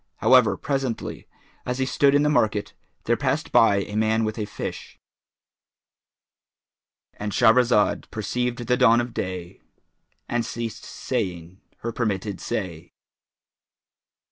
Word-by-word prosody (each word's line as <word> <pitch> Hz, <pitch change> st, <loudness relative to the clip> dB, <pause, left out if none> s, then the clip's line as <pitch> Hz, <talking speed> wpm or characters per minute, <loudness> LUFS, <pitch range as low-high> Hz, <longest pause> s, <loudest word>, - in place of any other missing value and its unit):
However 125 Hz, 0 st, +4 dB
presently, 135 Hz, -5 st, -3 dB, 0.4 s
as 125 Hz, 0 st, -3 dB
he 130 Hz, -, 0 dB
stood 140 Hz, +1 st, +3 dB
in 145 Hz, -, +4 dB
the -, -, +2 dB
market, 105 Hz, -7 st, +1 dB, 0.3 s
there 120 Hz, -, +2 dB
passed 140 Hz, +5 st, -1 dB
by 100 Hz, -3 st, +5 dB
a 105 Hz, -, -8 dB
man 110 Hz, +1 st, +2 dB
with 110 Hz, +1 st, -3 dB
a 105 Hz, -, -1 dB
fish,—And 105 Hz, +1 st, -12 dB
Shahrazad 115 Hz, 0 st, +3 dB
perceived 120 Hz, +3 st, -3 dB
the 125 Hz, +2 st, +2 dB
dawn 120 Hz, -2 st, +5 dB
of 120 Hz, -1 st, -3 dB
day 90 Hz, -3 st, -5 dB, 0.7 s
and 120 Hz, -1 st, 0 dB
ceased 115 Hz, -1 st, -5 dB
saying 90 Hz, 0 st, -4 dB, 0.2 s
her 115 Hz, -, -3 dB
permitted 105 Hz, -4 st, -2 dB
say. 85 Hz, -5 st, -5 dB
115 Hz, 115 wpm, -24 LUFS, 105-125 Hz, 0.7 s, by